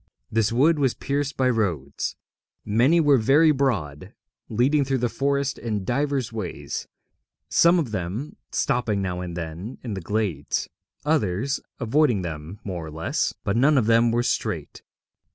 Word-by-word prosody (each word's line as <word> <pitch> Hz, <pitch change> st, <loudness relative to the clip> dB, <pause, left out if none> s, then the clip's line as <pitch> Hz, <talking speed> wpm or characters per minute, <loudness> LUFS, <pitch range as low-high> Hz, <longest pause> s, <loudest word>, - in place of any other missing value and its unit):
This 110 Hz, -1 st, +2 dB
wood 150 Hz, +7 st, +3 dB
was 135 Hz, -4 st, +2 dB
pierced 140 Hz, 0 st, -2 dB
by 130 Hz, -, +3 dB
roads. 90 Hz, -, -1 dB, 0.5 s
Many 120 Hz, +11 st, +4 dB
were 145 Hz, -4 st, +5 dB
very 145 Hz, +8 st, +5 dB
broad, 105 Hz, -, -1 dB, 0.3 s
leading 135 Hz, +6 st, +2 dB
through 135 Hz, 0 st, 0 dB
the 120 Hz, -1 st, 0 dB
forest 140 Hz, +2 st, -1 dB
in 105 Hz, -4 st, -3 dB
divers 135 Hz, -1 st, -1 dB
ways, 90 Hz, -9 st, -5 dB, 0.6 s
some 170 Hz, +2 st, +5 dB
of 150 Hz, -10 st, -1 dB
them 105 Hz, -, -4 dB, 0.2 s
stopping 115 Hz, -7 st, 0 dB
now 90 Hz, -1 st, -2 dB
and 90 Hz, -1 st, -5 dB
then 85 Hz, +8 st, -6 dB
in 115 Hz, -4 st, -4 dB
the 95 Hz, -, -4 dB
glades, 95 Hz, -6 st, -1 dB, 0.4 s
others 135 Hz, -, +1 dB, 0.2 s
avoiding 120 Hz, -4 st, +2 dB
them 80 Hz, +3 st, -6 dB
more 90 Hz, -4 st, -4 dB
or 80 Hz, -, -7 dB
less, 80 Hz, +2 st, -1 dB
but 100 Hz, -, 0 dB
none 140 Hz, +5 st, +4 dB
of 125 Hz, -, +3 dB
them 115 Hz, +1 st, +4 dB
were 120 Hz, +1 st, +1 dB
straight. -, -, -2 dB
115 Hz, 150 wpm, -24 LUFS, 95-140 Hz, 0.6 s, were